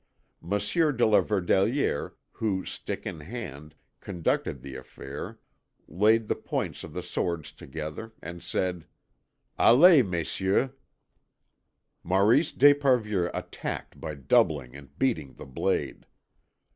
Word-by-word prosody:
Monsieur 105 - +1
de 120 -3 +2
la 110 - +5
Verdelière, 100 - +1 0.2
who, 100 -4 -2
stick - - -6
in 80 - -5
hand, 75 - -8 0.2
conducted 85 -7 -2
the 70 -1 -8
affair, 65 +2 -8 0.5
laid 110 +6 +3
the - - +2
points - - -4
of - - -9
the - - -3
swords 85 -4 -3
together, 80 +10 -7
and 85 0 -8
said: 90 -3 -2 0.7
"Allez, 155 +5 +8
Messieurs." 95 +6 0 1.3
Maurice 105 - +3
d'Esparvieu 125 -10 +4
attacked - - -6
by 80 -2 -5
doubling 65 -1 +1
and 70 -1 -13
beating 110 - -1
the - - -10
blade. 65 - -2
95 Hz, 110 wpm, -27 LUFS, 75-115 Hz, 1.3 s, Allez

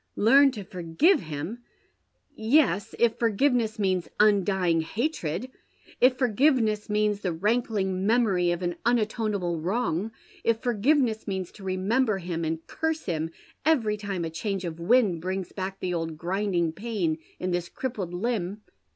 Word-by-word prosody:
" - - -49 0.2
Learned 275 -1 +7
to 205 - -5
forgive 185 - +2
him 160 - -5 0.7
1 - - -35
Yes, 220 - +2
if 235 -1 +2
forgiveness 230 0 +2
means 185 -4 0
undying 190 -5 +3
hatred; 215 - -3 0.5
if 255 0 +5
forgiveness 240 -4 +2
means 210 -1 +1
the 185 - -2
rankling 195 0 0
memory 210 -7 +3
of 175 +1 -1
an 175 -1 -2
un 240 +1 +4
atonable 205 -7 -1
wrong; 200 0 -1 0.3
if 230 -1 +2
forgiveness 240 0 +1
means 190 -3 -3
to 205 - -14
remember 200 +5 +1
him 170 -2 -4
and 160 0 -3
curse 320 0 -2
him 160 -2 -2 0.3
every 240 -10 +2
time 200 -4 -3
a 160 - -4
change 190 +3 -3
of 165 -1 -5
wind 195 -2 +3
brings 185 +1 -3
back 190 0 -5
the 180 -1 -2
old 165 -2 -3
grinding 175 -1 0
pain 195 -6 -2 0.2
in 185 0 -2
this 175 -1 -2
crippled 215 -9 -4
limb. 205 0 -2
200 Hz, 150 wpm, -26 LUFS, 175-230 Hz, 0.7 s, Learned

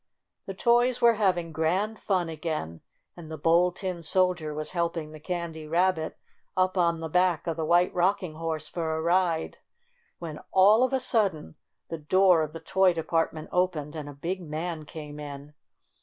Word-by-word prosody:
The 195 - -5
toys 240 +4 +3
were 235 -1 +6
having 185 -6 0
grand 185 +8 -1
fun 185 -4 0
again, 155 - -4 0.3
and 170 -3 -11
the 160 - -6
Bold 170 +4 +3
Tin 185 -4 -4
Soldier 175 -2 +1
was 155 +1 -3
helping 170 -3 -2
the 155 - -10
Candy 165 -2 -5
Rabbit 170 0 0 0.4
up 185 0 +2
on 170 -2 +2
the 160 0 -5
back 180 0 +1
of 165 - -2
the 160 0 -2
White 175 +2 +3
Rocking 180 -1 +1
Horse 160 -2 -3
for 160 -2 -3
a - - -2
ride, 170 -1 +1 0.6
when, 160 -3 -7
all 205 +5 +6
of 255 - +1
a 265 - +1
sudden, 200 - 0 0.4
the 165 - -5
door 180 +2 +4
of 155 -1 -2
the 165 - -8
toy 190 +1 +3
department 165 -1 -2
opened 165 -5 -1
and 150 -2 -6
a - - -8
big 175 +7 -4
man 160 0 -5
came 150 -1 -9
in. 145 0 -8
170 Hz, 175 wpm, -27 LUFS, 155-185 Hz, 0.6 s, were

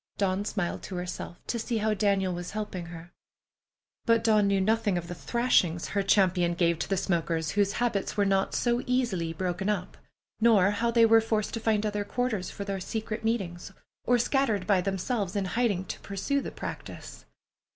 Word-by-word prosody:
Dawn 195 0 0
smiled 195 -5 -2
to 190 - -7
herself 180 -1 -5
to 235 - -2
see 230 +1 -2
how 215 0 +1
Daniel 195 -2 +1
was 175 0 -5
helping 185 -5 -4
her. 170 0 -10 1.0
But 230 -1 +4
Dawn 215 -2 +4
knew 200 -1 +2
nothing 210 -1 +1
of 170 -1 -4
the 175 - -5
thrashings 180 -6 +1
her 200 - 0
champion 185 -3 +3
gave 170 -1 +2
to - - -3
the 195 - +1
smokers 165 -3 0
whose 200 -1 +1
habits 225 -4 -1
were 205 - +3
not 195 0 +1 0.3
easily 235 -10 0
broken 185 +3 -2
up, 195 -4 -2 0.4
nor 215 -4 +5
how 230 +3 0
they 230 -1 +5
were 225 0 +6
forced 220 -2 -1
to 230 - -2
find 215 -1 +1
other 210 -1 -1
quarters 215 -3 -2
for 200 - -6
their 195 -1 -3
secret 220 +3 -4
meetings, 195 -5 -2 0.3
or 245 - +4
scatter 245 -2 +2
by 185 0 +1
themselves 195 +1 -2
in 200 -1 0
hiding 205 -2 0
to - - -6
pursue 240 +9 -2
the - - -5
practice. - - -8
200 Hz, 185 wpm, -28 LUFS, 180-220 Hz, 1.0 s, were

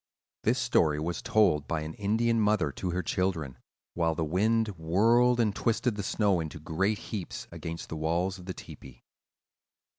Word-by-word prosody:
This 120 +4 +2
story 85 -12 +2
was 85 +3 -3
told 85 -10 +2
by 80 -2 -1
an 80 +1 -5
Indian 115 +4 +1
mother 105 -8 +2
to 90 - -4
her 90 +1 -1
children, 80 -7 -2 0.3
while 80 -1 +1
the 80 - -1
wind 110 +7 +2
whirled 110 +8 +3
and 105 -4 +2
twisted 115 +1 +1
the 105 - -3
snow 100 -2 +1
into 80 0 -5
great 95 +7 0
heaps 100 -5 -6
against 85 0 -6
the - - -4
walls 85 +4 -1
of 90 - -12
the 95 - -3
tepee. 65 -3 -12
90 Hz, 170 wpm, -29 LUFS, 80-110 Hz, 0.3 s, whirled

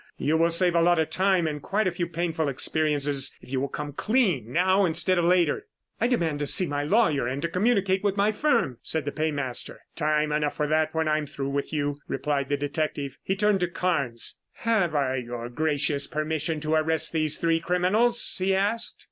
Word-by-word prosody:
You 155 +3 0
will 165 +1 +3
save 175 +1 +2
a 170 - +3
lot 175 +1 +4
of 160 - 0
time 190 -2 +2
and 150 -2 -3
quite 210 +7 0
a 185 - +1
few 175 0 -3
painful 165 -2 -2
experiences 145 -1 0
if - - -15
you 130 -1 0
will 140 - -1
come 145 0 -6
clean 185 - 0
now 185 +5 +3
instead 175 +1 +2
of 170 - +1
later." 180 - +2 0.3
"I - - +2
demand 165 - 0
to 145 - -2
see 185 - +2
my 145 -2 -2
lawyer 155 - +2
and 130 +3 -3
to - - +1
communicate 195 +1 +1
with 200 -1 0
my 205 +2 +3
firm," 215 - 0
said 160 -3 -2
the 145 - -2
paymaster. 145 -5 -3
"Time 150 -1 +1
enough 150 -1 0
for 150 - 0
that 155 +1 0
when 160 0 0
I 155 0 +2
am 150 - -5
through 140 0 -4
with 140 0 -3
you," 145 -1 -2
replied 140 -2 -2
the 145 - +1
detective. 145 -1 -3
He 190 - -2
turned 210 0 +2
to 180 - 0
Carnes. 165 -9 -2
"Have 205 -9 0
I 135 -2 +1
your 120 -1 -5
gracious 145 0 0
permission 155 0 -2
to 155 +1 -1
arrest 160 0 +1
these 155 -2 +1
three 165 -1 +1
criminals?" 190 +8 +3
he 190 0 +2
asked. 220 +5 +1
160 Hz, 205 wpm, -26 LUFS, 145-185 Hz, 0.3 s, lot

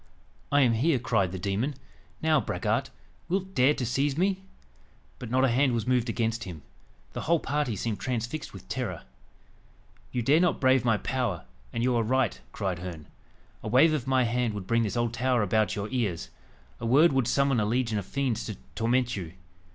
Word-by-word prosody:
"I 145 0 +5
am 120 -3 +4
here!" 135 +6 +2
cried 110 -7 +1
the 95 - -4
demon. 100 +10 -1 0.5
"Now, 155 -3 +4
braggart, - - -1 0.4
wilt 190 +1 -1
dare 135 +1 +4
to 125 - -2
seize 135 +4 0
me?" 190 +2 +1 0.8
But 125 - -7
not 130 +2 +3
a - - +3
hand 130 +2 +3
was 115 -3 -1
moved 125 -1 +1
against 115 0 -1
him. 85 -6 -8 0.5
The - - -4
whole 165 +1 +2
party 145 -6 -1
seemed 105 +1 -3
transfixed 125 +4 -3
with 95 -1 -12
terror. 115 -10 -4 1.1
"You 120 - -1
dare 145 +7 +4
not 180 -1 +2
brave 130 -2 +4
my 115 -3 +3
power, 120 - -2 0.3
and 115 - -2
you 125 0 +2
are 115 - +3
right," 130 +4 0
cried 95 -4 -3
Herne 85 -4 -8 0.5
"a - - -6
wave 155 +6 +5
of 140 -4 -2
my 130 -1 +3
hand 120 -2 0
would 100 -3 -5
bring 115 +3 +2
this 110 +1 -1
old 120 -1 0
tower 125 -1 +1
about 110 +2 +1
your 105 0 -3
ears 110 -10 -2 0.5
a - - -5
word 145 +6 +5
would 135 -3 +2
summon 140 -1 +2
a 105 - +1
legion 115 -2 0
of 100 - -6
fiends 130 -5 -1
to 105 - -4 0.2
torment 125 +2 +1
you." 85 -4 -6
120 Hz, 195 wpm, -28 LUFS, 110-135 Hz, 1.1 s, I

